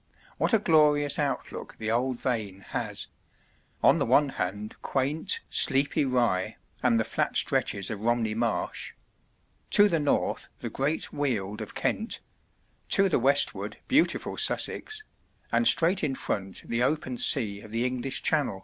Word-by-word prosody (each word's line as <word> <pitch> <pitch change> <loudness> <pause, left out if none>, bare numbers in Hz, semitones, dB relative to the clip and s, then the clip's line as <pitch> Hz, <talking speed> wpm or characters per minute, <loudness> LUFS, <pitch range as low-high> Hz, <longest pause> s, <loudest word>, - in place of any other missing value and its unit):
What - - +1
a 225 - +5
glorious 150 -6 +3
outlook 145 -2 -4
the 110 0 -3
old 125 +1 -1
vane 105 -6 -3
has - - -3 0.8
on - - +5
the - - +1
one 145 -1 +3
hand 105 -2 -5
quaint, 140 +4 -1
sleepy 140 +1 +2
Rye 115 -6 0 0.2
and 120 -3 +2
the - - +2
flat - - -1
stretches 100 +1 +1
of 105 - -5
Romney 115 0 0
Marsh; 115 0 -2 0.8
to 205 - +7
the 170 -5 0
north 145 -1 -1
the - - -6
great 145 +4 -2
Weald 110 -7 -2
of 110 - -8
Kent; 220 +2 -2 0.7
to 195 -1 +5
the 160 - +1
westward 115 -6 +1
beautiful 290 +5 +1
Sussex, 435 0 -1 0.5
and 235 - +3
straight 175 +3 +5
in 135 -3 -1
front 95 -6 -4
the 115 +1 -1
open 130 -1 -1
sea 105 -5 +3
of 110 - -13
the 115 +3 -1
English 130 +1 -1
Channel. 125 -9 +1
125 Hz, 150 wpm, -27 LUFS, 110-150 Hz, 0.8 s, to